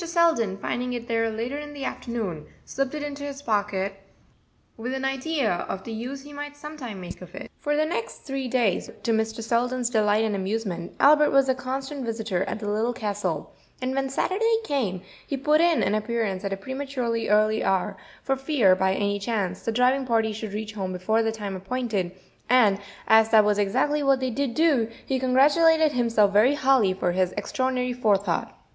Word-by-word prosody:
Selden, 330 - +2
finding 250 +5 -3
it 240 -1 -5
there 225 -1 +1
later 235 +6 -3
in 295 0 -8
the 280 -2 -5
afternoon, 215 -14 -4 0.2
slipped 275 +2 -2
it 300 - -4
into 285 -1 -5
his 285 0 -6
pocket, 200 -4 -1 0.7
with 250 +4 -4
an 265 0 -3
idea 270 -1 0 0.2
of 190 - -4
the 230 - -7
use 250 +5 -5
he 290 0 -12
might 290 0 -7
some 300 +1 -8
time 240 -9 -7
make 180 0 -8
of 180 0 -11
it. - - -8
For 295 -2 0
the 305 +1 +2
next 350 +9 -4
three 270 -2 -3
days, 240 -5 +1
to 230 - +1
Mr. 220 0 -1
Selden's 245 +2 0
delight 215 -1 +3
and 210 -2 -1
amusement, 190 -3 -3
Albert 300 +1 +6
was 275 -1 +4
a 260 - +3
constant 265 +2 -4
visitor 220 -5 -2
at - - -3
the 210 - -5
Little 220 +4 0
Castle, 205 -8 -3 0.3
and 255 0 -2
when 270 0 -1
Saturday 435 +11 +1
came 215 - -2 0.2
he 275 - -2
put 300 +4 +3
in 340 -2 +3
an 200 - +1
appearance 215 -3 -1
at 200 - -2
a - - -3
prematurely 255 0 -3
early 215 +1 +3
hour, 195 +1 0 0.3
for 270 - +1
fear, 265 -9 +3
by 190 0 +1
any 205 0 0
chance, 200 -4 -2
the 225 - -2
driving 255 +3 +2
party 225 -2 +2
should 215 -1 -6
reach 215 0 -4
home 190 -3 -3
before 215 +5 +1
the 225 0 0
time 205 -3 -5
appointed; 200 -2 -2 0.4
and 220 -6 +5 0.3
as 220 0 +6
that 220 -2 +6
was 210 0 +2
exactly 290 +9 +1
what 275 -2 +3
they 260 -1 -1
did 255 0 -2
do, 290 -9 +3 0.2
he 265 -1 -1
congratulated 300 +5 +4
himself 230 -6 +2
very 235 +8 +5
highly 265 -8 +3
for 185 -1 -1
his 185 0 0
extraordinary 255 -1 -1
forethought. 205 -7 0
235 Hz, 195 wpm, -25 LUFS, 205-270 Hz, 0.7 s, Albert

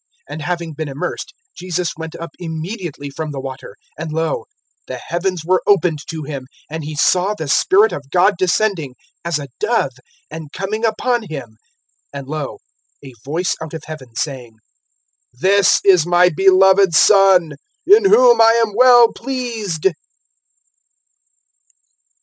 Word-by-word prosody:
(16)And 155 - -6
having 170 0 -4
been 155 +1 -5
immersed, 140 +1 -5 0.2
Jesus 180 -1 -3
went 160 0 -8
up 170 0 -8
immediately 165 -3 -6
from 155 +2 -5
the 140 -2 -6
water; 135 0 -8 0.2
and 160 0 -5
lo, 165 - -2 0.4
the - - -6
heavens 175 -1 -3
were 185 +1 +2
opened 180 -6 +2
to 160 -1 -5
him, 140 -3 -7 0.2
and 160 0 -5
he 150 +1 -6
saw 185 +7 +2
the 160 -6 -6
Spirit 200 +9 +3
of 140 -1 -7
God 180 +6 +3
descending, 180 -6 -1 0.3
as 170 -2 -1
a 145 -1 -7
dove, 220 - 0 0.4
and 155 -2 -9
coming 205 +6 -4
upon 230 0 -1
him. 130 -8 -8 0.6
(17)And 140 -1 -6
lo, 150 -3 -5 0.5
a 135 - -11
voice 165 +6 -1
out 160 0 -7
of 160 - -8
heaven, 130 -7 -10
saying: 125 -5 -5 0.8
This 190 +9 +3
is 185 -5 +5
my 175 +1 +4
beloved 190 -1 +4
Son, 190 -3 +5 0.3
in 410 +2 +5
whom 475 +5 +5
I 225 0 +6
am 210 - -10
well 245 -1 +6
pleased. 230 - -5
175 Hz, 145 wpm, -18 LUFS, 155-200 Hz, 0.8 s, I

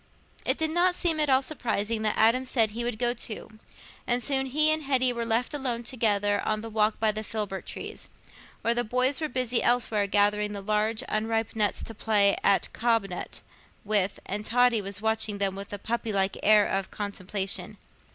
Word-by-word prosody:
It - - +2
did 315 -1 0
not 355 +2 +3
seem 330 -4 +1
at 300 -2 +2
all 265 0 +4
surprising 230 -6 -2
that 215 -1 0
Adam 230 +4 +4
said 230 -4 +1
he 235 +3 -4
would 240 -2 -2
go 240 +1 +1
too, 220 -2 -6 0.5
and 245 0 +1
soon 270 -2 +1
he 305 +4 +3
and 310 - -1
Hetty 260 -3 +1
were 235 -1 -3
left 235 +4 0
alone 250 -5 -2
together 205 -4 +1
on 215 0 -1
the 225 0 -8
walk 215 0 +1
by 220 -1 +3
the 215 +1 -5
filbert 210 -3 -4
trees, - - -8 0.5
while 230 +1 +3
the 240 0 0
boys 250 +5 +1
were 310 - -1
busy 255 -2 0
elsewhere 225 -4 +1
gathering 210 +1 +2
the 200 - -5
large 215 +3 0
unripe 225 +1 -1
nuts 210 -2 0
to 225 - -7
play 205 -2 +3
at 200 - +2
"cob 230 -4 +1
nut" 180 - -7 0.4
with, 200 -2 0
and 205 +2 -3
Totty 245 0 +3
was 200 +1 -4
watching 220 -2 +1
them 200 -1 0
with 200 +1 -8
a 205 - -4
puppylike 200 -3 -1
air 210 0 +5
of 195 0 -2
contemplation. 200 -1 -4
220 Hz, 190 wpm, -27 LUFS, 205-245 Hz, 0.5 s, air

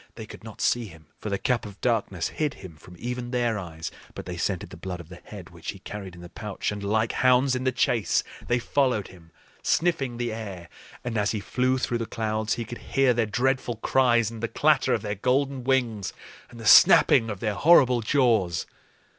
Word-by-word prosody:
They - - -8
could - - -12
not - - -10
see 120 -1 +1
him, 80 -4 -15
for 105 - -5
the 100 - -1
Cap 120 +4 0
of 100 -2 -10
Darkness 105 -8 -1
hid 150 -2 -2
him 95 -4 -11
from 90 +4 -15
even 125 +3 -4
their 120 -3 0
eyes; 80 -3 -7 0.2
but - - -7
they - - -5
scented - - -3
the - - -9
blood 90 -2 -6
of 85 -2 -11
the 85 -1 -12
head - - -10
which - - -9
he - - -12
carried 100 -3 -8
in 85 - -12
the 85 - -10
pouch, 105 0 -4
and 105 0 -5
like 110 +2 +1
hounds 130 +1 +3
in 125 +1 -3
the 130 - +3
chase, 120 -3 +1 0.2
they 120 - +2
followed 125 -3 0
him, 85 -3 -16 0.3
sniffing 140 -8 0
the 120 -2 -2
air. 95 -6 -7 0.3
And 115 -3 -2
as 105 +1 +1
he 110 - -2
flew 130 +5 0
through 120 -2 -1
the 115 - -3
clouds 110 -1 -1
he 115 - -4
could 120 +2 -8
hear 135 -2 +2
their 115 -2 0
dreadful 125 +2 0
cries 120 -1 +2
and 115 -1 -8
the 115 - -1
clatter 150 +2 +2
of 110 - -4
their 105 -1 -2
golden 130 +5 0
wings 120 -7 0 0.4
and 120 - -13
the 115 - -8
snapping 115 +1 +7
of 105 -3 -5
their 110 0 -1
horrible 130 -1 +5
jaws. 110 -9 +2
115 Hz, 215 wpm, -26 LUFS, 100-125 Hz, 0.4 s, snapping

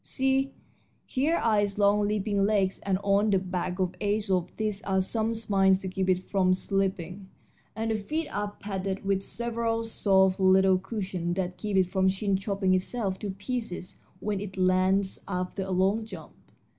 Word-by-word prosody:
See, 270 +1 0 0.5
here 290 +6 +1
are 215 -3 +2
its 205 -1 -2
long 205 0 +3
leaping 205 -1 0
legs, 195 -2 +1
and 195 -2 0
on 200 +2 +3
the 195 - +4
back 180 -1 -3 0.2
edge 205 0 0
of 180 -1 +1
these 210 -2 -2
are 190 -3 0
some 220 +4 0
spines 195 -4 +3
to 190 - -4
keep 190 0 -2
it 185 0 +1
from 185 -2 +2
slipping, 190 0 -2 0.5
and 225 +1 -1
the - - +1
feet 300 +10 -2
are 205 +1 -3
padded 195 -1 -4
with 195 -1 +1
several 230 +1 -1
soft 190 -4 +2
little 190 0 +5
cushions 185 -4 -3
that 180 -1 -2
keep 210 -2 -2
it 190 - +5
from 190 +1 +1
chin 195 +1 0
chopping 195 -1 0
itself 190 +1 -1
to 210 - -4
pieces 195 -1 -5 0.2
when 210 -2 -2
it 195 -2 -7
lands 185 +1 +2
after 185 +1 -3
a 190 - -4
long 190 +4 +2
jump. 185 -8 -10
195 Hz, 170 wpm, -28 LUFS, 190-210 Hz, 0.5 s, little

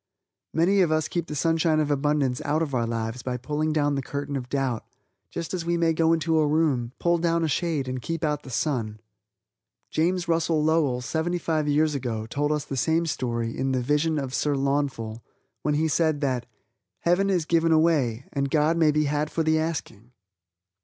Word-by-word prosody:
Many 185 +5 +3
of 170 -4 +2
us 155 -1 +1
keep 170 -2 -3
the 150 - -5
sunshine 160 +2 +2
of 150 -1 0
abundance 140 -3 +1
out 155 +3 +1
of 145 -4 -4
our 120 -2 +1
lives 115 +1 -3
by 125 0 -3
pulling 150 +5 -1
down 145 -2 +1
the 140 - -1
curtain 140 +2 -4
of 125 -2 -4
doubt 135 -5 -1 0.5
just 170 +1 -5
as 180 -2 -2
we 170 0 0
may 165 -1 +2
go 160 0 +2
into 165 -1 +2
a 155 - +3
room, 145 -6 +1
pull 170 0 +2
down 170 0 +1
a - - +2
shade 155 -3 -1
and 130 0 -3
keep 165 +5 -4
out 150 -2 0
the 135 - -11
sun. 115 -5 -2 0.9
James 175 +2 0
Russell 165 -2 +1
Lowell, 150 -6 +2
seventy 160 +7 -1
five 160 -3 -1
years 150 +1 +2
ago, 120 -5 -3
told 145 +6 -1
us 150 -1 -1
the 135 - -5
same 160 +5 +1
story 120 -6 -2
in 135 0 -1
"The 130 - +1
Vision 150 +4 +1
of 135 -3 -3
Sir 145 0 +1
Launfal," 135 -5 -1 0.4
when 150 -1 0
he 160 +2 +2
said 155 -1 +1
that 130 -4 -1 0.5
"Heaven 180 +3 +2
is 180 -5 +1
given 165 0 +2
away 150 -7 +2
and 140 0 -1
God 155 +3 +2
may 160 -2 +4
be 150 0 +2
had 150 +1 0
for 165 - -1
the 160 0 +2
asking". 135 -8 -4
150 Hz, 200 wpm, -25 LUFS, 135-165 Hz, 0.9 s, may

